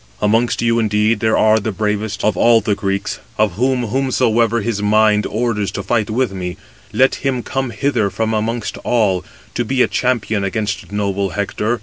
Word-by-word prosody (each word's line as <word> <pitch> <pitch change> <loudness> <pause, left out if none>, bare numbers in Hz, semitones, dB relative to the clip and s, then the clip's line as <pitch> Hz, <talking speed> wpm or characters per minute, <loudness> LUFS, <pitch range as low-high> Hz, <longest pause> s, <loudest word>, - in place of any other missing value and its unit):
Amongst 115 +3 +1
you, 115 0 +2
indeed, 105 0 +1
there 110 +1 +2
are 110 0 +4
the 110 +1 -3
bravest 105 0 -2
of 105 -2 +2
all 115 +4 +5
the 110 -1 0
Greeks, 100 -1 -2 0.2
of 105 -2 +2
whom 125 +5 0
whomsoever 115 -2 +1
his 105 -1 -2
mind 105 0 +3
orders 110 -3 -1
to 100 - -4
fight 110 +1 0
with 125 +1 0
me, 90 -2 -5 0.3
let 130 +1 +3
him 130 -3 -1
come 135 -2 -2
hither 120 -3 0
from 110 +3 -2
amongst 110 +1 -2
all, 100 -7 +1 0.3
to 120 - -1
be 130 +2 +2
a - - +2
champion 120 -5 0
against 100 0 -3
noble 100 -1 -1
Hector. 105 +4 -2
110 Hz, 180 wpm, -18 LUFS, 105-120 Hz, 0.3 s, all